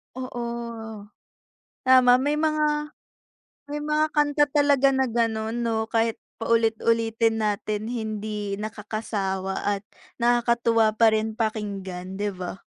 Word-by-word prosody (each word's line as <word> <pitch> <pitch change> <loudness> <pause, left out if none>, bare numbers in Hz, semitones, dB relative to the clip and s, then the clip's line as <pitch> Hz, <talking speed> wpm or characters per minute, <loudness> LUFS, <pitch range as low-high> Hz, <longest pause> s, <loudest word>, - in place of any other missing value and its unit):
Oo, 255 -2 -5 1.4
tama 255 -1 +6
may 290 +3 +1
mga, 300 -1 0 0.7
may 295 +1 -5
mga 305 +1 +1
kanta 295 -1 +3
talaga 285 -2 +3
na 265 -1 +1
gano'n 225 -1 -1
'no, 220 -1 -1
kahit 225 -1 0 0.2
paulit-ulitin 225 0 +1
natin 210 +1 -2
hindi 215 -3 -4
nakakasawa 205 -3 -3
at 205 -1 0 0.4
nakakatuwa 235 -2 +3
pa 225 +1 +5
rin 220 0 0
pakinggan 200 -5 -4
'di 205 +1 -2
ba? 185 +1 -6
225 Hz, 110 wpm, -25 LUFS, 215-255 Hz, 1.4 s, tama